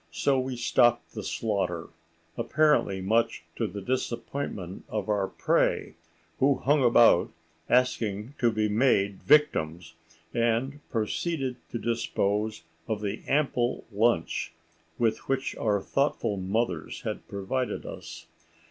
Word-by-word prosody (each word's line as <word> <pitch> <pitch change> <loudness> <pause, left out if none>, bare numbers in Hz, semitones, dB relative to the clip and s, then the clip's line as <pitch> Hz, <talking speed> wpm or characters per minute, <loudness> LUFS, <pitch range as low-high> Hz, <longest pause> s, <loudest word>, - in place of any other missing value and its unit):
So 135 +10 +1
we 130 0 -3
stopped 120 0 +2
the 110 - -5
slaughter—apparently 90 - -1
much 110 +5 +1
to - - -1
the 100 +2 -6
disappointment 115 -5 -3
of 105 -2 -3
our 100 -2 +1
prey, - - +1 0.5
who 140 +1 +4
hung 140 +2 +2
about 120 -6 +6 0.4
asking 115 -2 +1
to 120 -1 +3
be 110 -1 +1
made 105 -3 +2
victims—and 85 - 0
proceeded 130 +4 -2
to - - -3
dispose 110 -4 -1 0.2
of 110 -2 -2
the 105 +1 -3
ample 135 -4 +1
lunch 105 -5 +1 0.4
with 115 +1 0
which 135 -1 -1
our 105 -2 +1
thoughtful 140 -6 0
mothers 95 -2 -2
had - - -5
provided 100 +6 -3
us. - - -8
110 Hz, 110 wpm, -28 LUFS, 95-130 Hz, 0.5 s, about